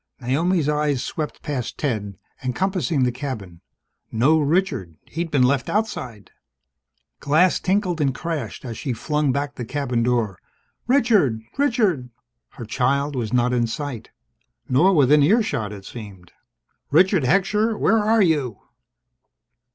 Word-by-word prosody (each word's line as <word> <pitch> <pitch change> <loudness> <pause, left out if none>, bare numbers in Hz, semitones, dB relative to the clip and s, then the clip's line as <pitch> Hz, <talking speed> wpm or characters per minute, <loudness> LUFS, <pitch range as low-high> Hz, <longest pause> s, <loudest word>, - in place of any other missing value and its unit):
Naomi's 155 +6 +1
eyes 150 -3 0
swept 150 +3 -5
past 135 -6 -4
Ted, 105 -9 -3 0.3
encompassing 160 +1 0
the 125 - +2
cabin. 120 -10 -6 0.5
No 135 +8 +3
Richard! 150 - 0
He'd 165 +2 -4
been 140 -4 +3
left 130 0 +1
outside... 130 - -3 0.9
Glass 160 +6 +3
tinkled 185 -4 0
and 140 -2 +2
crashed 155 - -5
as 115 -3 -6
she 130 - -2
flung 150 +4 0
back 140 +1 -2
the 125 - -6
cabin 125 -1 -2
door. 115 -5 0 0.5
"Richard! 215 - +3
Richard!" 215 - +1 0.4
Her 120 - -8
child 140 +5 0
was 115 -4 -3
not 125 0 +2
in 120 -1 +1
sight. 130 -1 -5 0.6
Nor 155 +10 +4
within 145 0 +5
earshot, 150 - +2
it 100 -2 -10
seemed. 95 -6 -10 0.6
"Richard 185 +4 +4
Heckscher! 210 - +2
Where 225 - +3
are 215 0 +3
you?" 145 - 0
140 Hz, 130 wpm, -22 LUFS, 120-175 Hz, 0.9 s, within